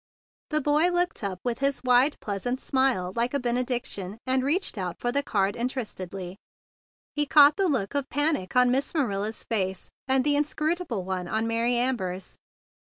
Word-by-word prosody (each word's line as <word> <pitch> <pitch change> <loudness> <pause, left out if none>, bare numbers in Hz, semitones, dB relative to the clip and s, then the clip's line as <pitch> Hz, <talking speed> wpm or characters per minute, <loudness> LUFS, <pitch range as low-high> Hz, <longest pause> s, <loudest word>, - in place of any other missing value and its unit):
The 305 -1 +2
boy 295 +5 +3
looked 355 -7 -1
up 190 -2 -3
with 240 -2 -2
his 275 0 0
wide, 255 +3 +3
pleasant 235 +5 -3
smile 260 -11 0
like 240 +4 0
a - - +1
benediction, 240 -5 -2
and 260 0 +2
reached 320 +6 0
out 180 -2 -4
for 240 - -1
the 280 +3 +2
card 200 -7 0
interestedly. 195 -7 -5 0.8
He 295 -1 +1
caught 290 0 +7
the 390 -2 +1
look 240 -8 -1
of 280 -1 -2
panic 290 - 0
on 250 0 +5
Miss 275 +5 0
Manila's 220 -6 -1
face 190 -5 -2 0.2
and 265 0 +3
the 290 +1 +3
inscrutable 305 - -1
one 185 -1 -3
on 220 +4 -1
Mary 230 +2 +1
Amber's. 205 -7 -2
250 Hz, 170 wpm, -26 LUFS, 200-285 Hz, 0.8 s, caught